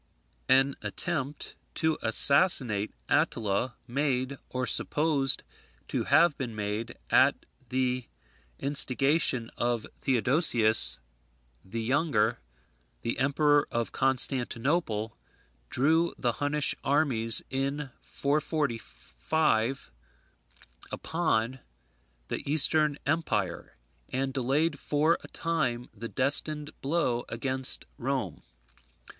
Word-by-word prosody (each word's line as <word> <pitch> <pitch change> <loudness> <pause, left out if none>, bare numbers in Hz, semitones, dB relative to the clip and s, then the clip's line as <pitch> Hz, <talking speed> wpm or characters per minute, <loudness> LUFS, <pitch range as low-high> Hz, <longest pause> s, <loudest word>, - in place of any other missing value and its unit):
An 135 +1 +4
attempt 150 -4 -4 0.2
to 160 0 0
assassinate 120 - +4 0.2
Attila, 110 +3 0
made, 130 0 -1
or 125 0 -2
supposed 145 -1 +1 0.5
to - - -2
have 155 +2 +4
been 120 -4 -4
made, 105 +2 -4
at - - +3 0.2
the 125 -1 -1 0.5
instigation 140 -2 +1
of 120 -2 0 0.2
Theodosius 115 - +4 0.7
the 115 +4 -5
Younger, 120 -4 +1 0.6
the 115 - -2
Emperor 145 +1 +2
of 115 -1 -2
Constantinople, 130 -2 0 0.5
drew 160 +6 +1
the 120 - 0
Hunnish 145 +4 0
armies, 130 -6 +2
in 135 +1 -3
445, 140 - -1 1.0
upon 130 -7 -1 0.7
the - - -3
Eastern 150 0 +3
empire, 105 - -2 0.3
and 135 +1 -2
delayed 140 +4 0
for 155 +3 +1
a - - -10
time 130 -8 -2
the 115 +2 -7
destined 145 +3 0
blow 135 -5 0
against 130 +2 -2
Rome. 125 - -3
135 Hz, 90 wpm, -28 LUFS, 115-150 Hz, 1.0 s, An